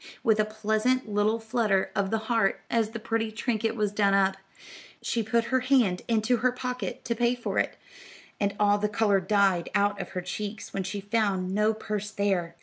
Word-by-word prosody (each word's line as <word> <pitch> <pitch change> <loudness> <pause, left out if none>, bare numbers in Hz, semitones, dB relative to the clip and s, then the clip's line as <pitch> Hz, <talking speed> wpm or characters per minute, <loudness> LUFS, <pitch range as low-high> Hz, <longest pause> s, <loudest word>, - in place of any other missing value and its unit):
With 220 -3 +3
a 215 - +4
pleasant 220 +4 0
little 210 +2 +1
flutter 220 -4 0
of 200 -2 0
the 225 - +1
heart 225 -4 +1
as 225 -2 +2
the 225 - -6
pretty 225 0 -1
trinket 225 0 -1
was 210 -3 0
done 200 -1 +2
up, 195 -1 +3 0.7
she 235 - 0
put 230 +2 +1
her 260 - +5
hand 250 -8 +2
into 230 +2 +2
her 250 +1 +2
pocket 250 -5 -5
to 235 - 0
pay 240 +1 +1
for 245 - -2
it, - - -1 0.6
and 200 -1 0
all 205 0 +4
the 210 0 0
color 205 -2 +2
died 190 -2 +2
out 205 0 +2
of - - -7
her 180 - -2
cheeks 205 +4 -6
when 195 - -1
she 190 +2 -4
found 200 -3 0
no 210 +2 +3
purse 210 -1 -4
there. 190 -5 -1
215 Hz, 195 wpm, -27 LUFS, 200-230 Hz, 0.7 s, her